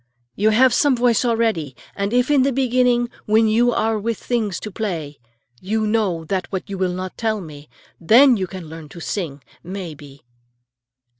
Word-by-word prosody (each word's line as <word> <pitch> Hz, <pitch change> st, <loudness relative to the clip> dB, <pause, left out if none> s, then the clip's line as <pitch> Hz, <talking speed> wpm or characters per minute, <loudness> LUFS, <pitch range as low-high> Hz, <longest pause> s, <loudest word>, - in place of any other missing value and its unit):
You 215 Hz, +2 st, +2 dB
have 245 Hz, +3 st, +4 dB
some 285 Hz, +1 st, +3 dB
voice 240 Hz, -1 st, +2 dB
already, 225 Hz, -, 0 dB, 0.2 s
and 200 Hz, 0 st, -2 dB
if 250 Hz, +3 st, +2 dB
in 285 Hz, -2 st, +4 dB
the 275 Hz, +2 st, +2 dB
beginning, 250 Hz, -2 st, +2 dB, 0.2 s
when 220 Hz, +1 st, +4 dB
you 235 Hz, +3 st, +3 dB
are 220 Hz, -1 st, 0 dB
with 230 Hz, +2 st, -2 dB
things 220 Hz, -7 st, -2 dB
to 215 Hz, -, -6 dB
play, 170 Hz, -9 st, -4 dB, 0.4 s
you 215 Hz, +3 st, -1 dB
know 205 Hz, -7 st, 0 dB
that 185 Hz, +2 st, -3 dB
what 190 Hz, -1 st, -4 dB
you 195 Hz, -2 st, -6 dB
will 185 Hz, -1 st, 0 dB
not 185 Hz, 0 st, -6 dB
tell 220 Hz, -2 st, 0 dB
me, 150 Hz, -5 st, -11 dB, 0.3 s
then 245 Hz, +9 st, +6 dB
you 190 Hz, -3 st, -2 dB
can 185 Hz, -3 st, -9 dB
learn 160 Hz, -1 st, -10 dB
to 170 Hz, -, -11 dB
sing, 160 Hz, -6 st, -4 dB, 0.2 s
may 185 Hz, -2 st, -6 dB
be." 140 Hz, -2 st, -15 dB
210 Hz, 180 wpm, -21 LUFS, 175-235 Hz, 0.4 s, then